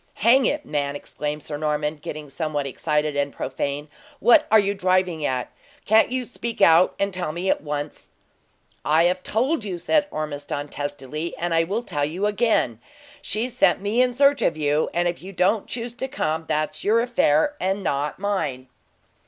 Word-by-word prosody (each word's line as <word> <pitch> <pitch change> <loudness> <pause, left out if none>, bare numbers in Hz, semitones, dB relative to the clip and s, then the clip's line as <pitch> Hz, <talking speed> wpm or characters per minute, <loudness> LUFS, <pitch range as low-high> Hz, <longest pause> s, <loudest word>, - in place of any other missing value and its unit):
Hang 245 +3 +4
it, 295 0 -2
man!" 145 -1 -2
exclaimed 150 +1 -5
Sir 145 - -5
Norman, 150 0 -1
getting 150 0 -7
somewhat 145 0 -3
excited 150 +2 -1
and 140 0 0
profane, 140 +3 -4 0.3
"what 235 +2 +5
are 220 - +7
you 200 -1 +2
driving 185 -4 +1
at? 125 -1 -2 0.3
Can't 220 +3 +4
you 255 -1 -1
speak 235 -1 -6
out 165 +2 +5
and 200 -1 -1
tell 180 -4 -3
me 175 +4 0
at - - -1
once?" 145 0 -5 0.7
"I 155 +2 +4
have 180 +1 +1
told 255 - 0
you!" 190 -4 -4
said 295 - +1
Ormiston, 145 - -4
testily: 145 +3 -5
"and 175 0 -2
I 165 0 +3 0.2
tell 145 -11 -3
you 170 +7 -1
again, 210 - +1 0.4
she 220 +4 -1
sent 230 -8 +2
me 205 +5 +1
in 255 0 +3
search 280 +1 +4
of 160 - +1
you, 150 0 +1
and 175 0 +1
if 175 0 -3
you 190 +2 -9
don't 195 +4 +1
choose 235 0 -4
to 260 +2 -4
come, 160 - -2
that's 155 0 -2
your 215 +3 +3
own - - +2
affair, 240 - +2
and 195 +2 -1
not 145 -2 -1
mine." 160 -11 -2
170 Hz, 180 wpm, -23 LUFS, 150-215 Hz, 0.7 s, are